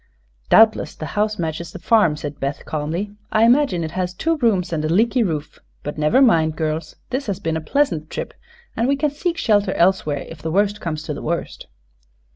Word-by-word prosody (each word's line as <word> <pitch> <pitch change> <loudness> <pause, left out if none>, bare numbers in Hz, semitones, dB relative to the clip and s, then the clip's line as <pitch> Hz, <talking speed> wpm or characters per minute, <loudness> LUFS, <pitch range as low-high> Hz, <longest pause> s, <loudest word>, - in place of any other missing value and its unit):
"Doubtless 220 -1 +5
the 155 - -6
house 210 +1 0
matches 165 -1 -4
the - - -8
farm," 175 -4 +3
said 145 -1 -6
Beth, 140 +1 -3
calmly. 160 +7 -3 0.2
"I 215 0 +3
imagine 235 - +3
it 160 - -4
has 180 -1 -3
two 325 - 0
rooms 205 - +1
and 155 -2 -1
a 155 - -1
leaky 225 +8 +3
roof. 160 -8 -3 0.2
But 150 +1 -5
never 150 - +4
mind, 160 -10 +3
girls. 155 0 -3 0.2
This 260 +1 -2
has 200 -2 -2
been 165 -4 -2
a 160 - -2
pleasant 160 - 0
trip, - - -5 0.4
and 230 +2 +1
we 280 - +3
can 290 +1 0
seek 335 +4 -2
shelter 205 -3 +2
elsewhere 170 -5 +1
if 165 -2 -11
the 160 - -3
worst 205 +4 +1
comes 155 -2 -3
to 150 - -4
the 145 - -7
worst." 170 +2 -4
180 Hz, 205 wpm, -21 LUFS, 155-225 Hz, 0.4 s, Doubtless